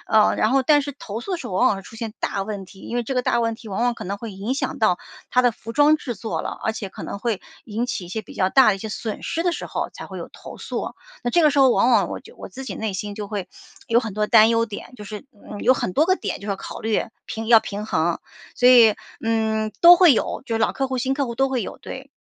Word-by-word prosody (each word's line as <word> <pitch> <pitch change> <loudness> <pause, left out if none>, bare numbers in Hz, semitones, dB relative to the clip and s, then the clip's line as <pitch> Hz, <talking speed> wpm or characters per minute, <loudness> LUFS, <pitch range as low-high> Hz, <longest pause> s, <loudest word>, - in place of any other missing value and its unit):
呃， 215 -1 +4
然 215 - +2
后 270 +1 +3
但 295 +2 +5
是 285 0 -5
投 220 -2 -6
诉 380 - -5
的 360 - -1
时 250 - -7
候 - - -7
往 245 - +4
往 210 - +3
会 195 - -8
出 225 - -13
现 220 -1 -5
大 195 - -2
问 200 -2 -5
题， 190 +1 -16
因 - - -6
为 240 - +1
这 260 +3 -4
个 250 - +1
大 235 - +1
问 230 -1 -1
题 230 - -14
往 200 +4 -2
往 245 0 +2
可 - - -8
能 195 +3 -3
会 225 +1 -7
影 200 +6 -3
响 275 - -3
到 - - +3 0.3
它 250 -1 +3
的 245 - +4
服 230 0 -9
装 295 +3 +5
制 245 -5 -5
作 220 +2 -4
了， - - -4
而 220 - 0
且 215 -3 -5
可 - - -10
能 200 - -5
会 225 -3 -2 0.2
引 225 +2 -2
起 240 -6 -3
一 175 - -11
些 220 +4 -4
比 - - -13
较 185 -1 +1
大 265 +2 +6
的 200 - +3
一 - - -11
些 220 - -6
损 215 0 -5
失 330 - -1
的 355 - +2
时 - - -6
候 - - -3
才 - - -9
会 - - -8
有 - - -7
投 - - -11
诉。 - - -4 0.3
那 240 - -1
这 345 - +4
个 305 - +6
时 280 - 0
候 265 -2 +6
往 245 - +3
往 205 -6 +4
我 - - -5
就 - - -16
我 - - -9
自 265 +8 -9
己 - - -5
内 220 -2 -3
心 205 +2 -4
就 210 -1 -5
会， 200 -3 -4 0.4
有 230 +1 +4
很 225 -4 -5
多 210 0 0
担 220 0 +7
忧 230 0 +2
点， 215 +3 -8
就 210 - -9
是， 210 +4 -8 0.3
嗯， 205 - -6
有 255 - +6
很 185 - -2
多 300 - +3
个 370 - +4
点 - - -4
就 - - -15
是 210 - -7
要 195 - -1
考 - - -8
虑， 220 -1 +1 0.2
平 225 0 -5
要 230 -2 +9
平 205 0 -5
衡。 165 -3 0 0.4
所 250 - +4
以， 235 -4 +8 0.3
嗯， 220 -1 0
都 345 +1 +10
会 350 -5 +7
有， - - -1
就 230 - -3
是 225 - +1
老 225 - +2
客 270 - -1
户、 260 -1 -2
新 265 +2 0
客 280 0 0
户 235 - -5
都 270 +2 +2
会 255 -4 -1
有。 - - -7
对。 265 +1 -9
225 Hz, 330 characters per minute, -22 LUFS, 210-255 Hz, 0.4 s, 都